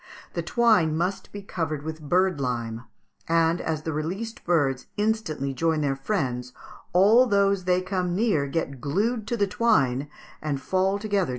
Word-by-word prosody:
The - - -1
twine 215 -10 +3
must 180 +4 -2
be 205 0 -8
covered 155 -6 -3
with 160 0 -6
bird 180 +1 +1
lime, 120 -2 -3 0.4
and, 165 +1 +3
as 155 -2 -2
the 160 - -3
released 190 +10 -4
birds 140 -7 +1
instantly 205 -11 -1
join 160 +3 +1
their 140 -2 0
friends, 130 -6 -2 0.4
all 215 +8 +6
those 200 -3 +2
they 180 0 +2
come 185 -2 -1
near 195 -9 +1
get 140 -3 -3
glued 215 - -1
to 235 - -1
the 205 - +3
twine 145 - +1 0.3
and 150 -3 -2
fall 190 +7 +1
together - - -9
to 215 +1 -6
the 200 -1 +2
ground. 180 - 0
170 Hz, 175 wpm, -25 LUFS, 145-200 Hz, 0.4 s, all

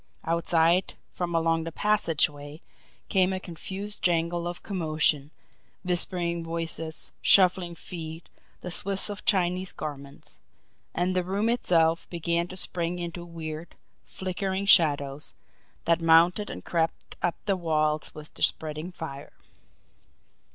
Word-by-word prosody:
Outside, 170 +1 +2 0.2
from 175 -1 -3
along 165 0 +2
the 165 - -5
passageway, 155 -7 0 0.4
came 185 -1 +3
a 190 - -2
confused 195 +4 -6
jangle 170 0 +1
of 175 0 -6
commotion 155 -6 +1 0.5
whispering 175 -1 0
voices, 165 -1 -3
shuffling 180 -2 +5
feet, 165 -1 -8 0.3
the 180 - -6
swish 195 +3 -1
of 205 - -7
Chinese 185 -1 +2
garments. 140 -2 -8 0.6
And 180 +2 0
the 180 - +2
room 200 +5 0
itself 165 -8 +2
began 170 0 -1
to 185 - -8
spring 175 -1 -1
into 175 0 -5
weird, 165 -1 -7 0.3
flickering 190 +1 -3
shadows, 145 -7 +4 0.5
that 170 0 +3
mounted 170 +5 +5
and - - -8
crept 165 -1 -1
up 175 - +1
the 200 -2 +2
walls 155 -3 0
with 150 0 -8
the - - -8
spreading 155 +3 0
fire. 145 -5 -8
170 Hz, 125 wpm, -27 LUFS, 160-185 Hz, 0.6 s, shuffling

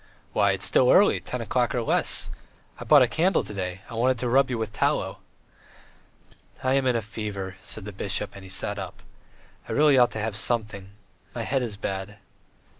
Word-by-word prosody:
"Why, 100 -1 +3
it's 95 -1 -1
still 125 +5 +4
early, 205 +8 +5
ten 125 - -5
o'clock 120 +2 0
or 120 - 0
less. - - +1 0.5
I - - -6
bought 145 -3 +7
a - - +3
candle 175 +9 +1
to - - -9
day; 90 -1 -4
I - - -11
wanted 125 +3 +1
to 120 +1 -2
rub 135 +2 +4
you 125 - -2
with 110 -1 -4
tallow." - - 0 1.4
"I 130 0 +2
am 135 -1 +2
in 125 - +2
a 115 - -1
fever.. 100 -3 -5
." - - -25
said 100 +2 -6
the 105 - -6
bishop, 100 +1 -2
and 100 - -11
he 95 - -11
sat 100 +2 -1
up. 95 -3 -8 0.7
"I - - -2
really 145 -3 +5
ought 120 - +5
to 110 - -4
have 110 -1 -2
something. 105 -2 -2 0.4
My 115 - -3
head 135 +3 0
is 110 -5 -4
bad. 100 +1 -5
110 Hz, 205 wpm, -25 LUFS, 100-125 Hz, 1.4 s, bought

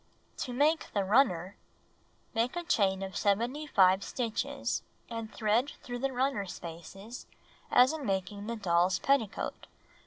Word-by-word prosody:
To 250 - -3
Make 295 +6 +2
the 200 - +2
Runner 195 -4 +2 0.8
Make 230 +4 0
a 350 - -2
chain 195 - +2
of 190 0 -6
75 205 -3 +2
stitches, 265 +4 -2 0.3
and 230 -1 -5
thread 230 +6 +1
through 245 0 -5
the 270 +1 -1
runner 255 -5 0
spaces 185 +7 -9 0.4
as 250 +4 +6
in 315 -2 -5
making 200 0 -2
the 235 - -2
doll's 180 -3 +2
petticoat. 275 -8 0
225 Hz, 130 wpm, -31 LUFS, 195-265 Hz, 0.8 s, as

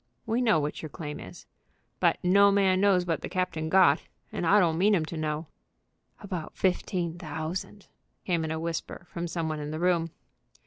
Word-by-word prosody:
"We 230 +3 0
know 220 -9 +4
what 150 0 -3
your 155 - -6
claim 150 0 -6
is." 90 - -11 0.5
"But - - +3
no 200 +3 +6
man 190 -2 +3
knows 190 -3 +4
what 165 -2 -1
the - - -5
captain 180 -4 -2
got, 190 +1 +5 0.3
and 170 - -2
I 205 +5 +6
don't 165 -3 +2
mean 205 +2 +4
'em 160 -4 0
to 165 - -7
know." 155 0 -2 0.8
"About 180 -5 -6
fifteen 180 -2 -1
thousand," 170 +5 -5 0.4
came 170 -3 0
in 160 - -3
a 160 0 -2
whisper 165 +1 -4
from 170 0 -3
some 165 -1 -2
one 155 -1 -3
in 150 0 -5
the 155 +1 -4
room. 170 -2 +2
170 Hz, 190 wpm, -28 LUFS, 160-185 Hz, 0.8 s, no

